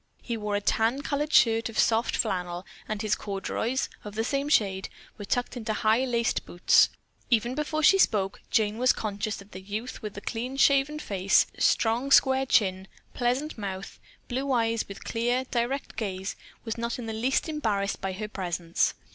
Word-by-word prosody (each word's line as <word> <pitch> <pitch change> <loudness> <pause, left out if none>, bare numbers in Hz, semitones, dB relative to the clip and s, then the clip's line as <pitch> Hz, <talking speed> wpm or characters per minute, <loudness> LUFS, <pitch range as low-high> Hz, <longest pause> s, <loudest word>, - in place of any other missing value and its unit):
He 235 - -3
wore 210 -2 -2
a 205 - 0
tan 230 +7 +1
colored 295 +2 -1
shirt 225 -3 +4
of 225 - -8
soft 225 +1 +2
flannel, 180 -4 -2 0.2
and 215 0 -2
his 215 - +1
corduroys, 220 +5 -2 0.2
of 210 0 -8
the 225 - 0
same 275 +4 -1
shade, 195 -8 +2 0.3
were 205 - -5
tucked 245 +5 -1
into 225 -2 -3
high, 220 +4 +2
laced 235 -2 0
boots. 175 - +4 0.4
Even 240 +1 +2
before 300 +2 -2
she 390 +5 +6
spoke, 195 - +2
Jane 215 -1 +1
was 255 0 +4
conscious 215 0 -3
that 200 +1 -13
the 185 - -8
youth 215 +6 -5
with 210 -3 -6
the 205 - -7
clean 245 +5 -4
shaven 280 +2 +4
face, 195 -8 +2
strong 235 +4 +2
square 265 -1 +5
chin, 190 -5 +2 0.3
pleasant 250 +3 -1
mouth, 195 -1 -6 0.3
blue 270 +3 -2
eyes 230 -2 +1
with 200 - -9
clear, 240 +2 0
direct 245 +3 -2
gaze 190 -3 -3 0.3
was 225 0 -4
not 235 0 -2
in 245 - -6
the 225 - -4
least 250 +8 0
embarrassed 215 -11 -1
by 190 0 -2
her 210 +3 -5
presence. 175 -4 -1
225 Hz, 180 wpm, -27 LUFS, 200-255 Hz, 0.4 s, she